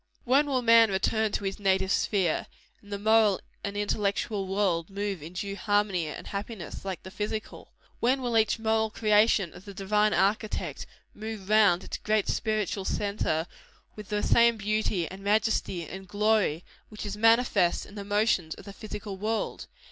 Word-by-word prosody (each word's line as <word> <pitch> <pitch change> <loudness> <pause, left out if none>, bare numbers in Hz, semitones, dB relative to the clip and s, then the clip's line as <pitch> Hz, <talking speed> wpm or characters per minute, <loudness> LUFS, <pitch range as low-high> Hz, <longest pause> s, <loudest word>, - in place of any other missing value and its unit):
When 275 +4 +3
will 260 -3 0
man 230 -1 +7
return 215 +3 +1
to - - -2
his 195 0 -3
native 190 -1 +1
sphere, 190 -7 +1 0.3
and 205 - -16
the 200 - -2
moral 215 -1 +4 0.2
and 200 0 -4
intellectual 205 0 -1
world 185 -4 0
move 200 -3 -3
in 160 +4 -9
due 195 +2 -4
harmony 205 -4 0
and 150 - -7
happiness, 200 -3 -6
like 190 -4 -5
the 190 - -9
physical? 215 +1 -5 0.3
When 260 +2 +1
will 240 -2 -1
each 220 0 +3
moral 220 0 +1
creation 210 -4 +3
of 185 - -13
the 200 -1 -10
Divine 210 +2 +2
Architect, 210 +3 -1 0.3
move 215 -2 -7
round 205 -4 +4
its - - -5
great 215 -1 0
spiritual 215 -3 -1
centre, 200 -6 -1 0.5
with 210 -2 -10
the 210 -1 -1
same 235 -1 +4
beauty, 210 -4 -1
and 190 +1 -10
majesty, 205 -5 0
and 190 +1 -9
glory, 205 -4 +1 0.2
which 215 - -7
is 205 - -4
manifest 225 -4 +3
in - - -14
the 205 -1 -6
motions 205 -5 +1
of - - -13
the 200 - -9
physical 205 -2 -7
world? 215 +3 -3
205 Hz, 170 wpm, -28 LUFS, 195-220 Hz, 0.5 s, man